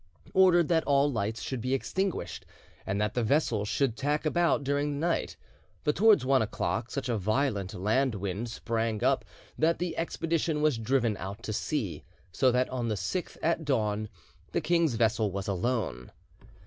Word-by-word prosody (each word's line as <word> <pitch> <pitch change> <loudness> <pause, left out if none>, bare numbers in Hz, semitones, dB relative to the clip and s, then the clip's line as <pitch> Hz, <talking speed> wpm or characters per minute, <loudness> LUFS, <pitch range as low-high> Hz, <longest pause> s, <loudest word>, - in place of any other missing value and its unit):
] - - -33
ordered 180 -3 +5
that 165 -2 +2
all 140 0 +3
lights 110 -2 -2
should 130 -3 -3
be 130 +3 0
extinguished 190 +7 -2 0.4
and 95 +1 -1
that 105 0 0
the 125 - 0
vessels 115 -4 +1
should 135 -5 +1
tack 145 +3 -1
about 165 -1 +2
during 145 +1 0
the 165 - +1
night; 170 - -1 0.5
but 150 - +1
towards 205 - +5
one 135 0 +4
o'clock 115 +2 -2
such 140 -2 -3
a 115 -3 0
violent 105 -2 0
land 110 +6 +1
wind 100 +4 -3
sprang 115 -1 -2
up - - +2 0.4
that 165 +2 +3
the 175 -1 -3
expedition 165 -1 -1
was 150 -7 +2
driven 115 -1 +1
out 100 +5 -7
to 110 - -3
sea, 115 - -2 0.3
so 130 +6 +3
that 125 +1 +2
on 125 -2 -2
the 110 - 0
6th 180 - -3
at 165 0 +1
dawn 110 -7 0 0.4
the - - +2
king's 165 -4 +2
vessel 110 -1 +2
was 100 0 -4
alone. 95 - -2
125 Hz, 175 wpm, -29 LUFS, 110-150 Hz, 0.5 s, ordered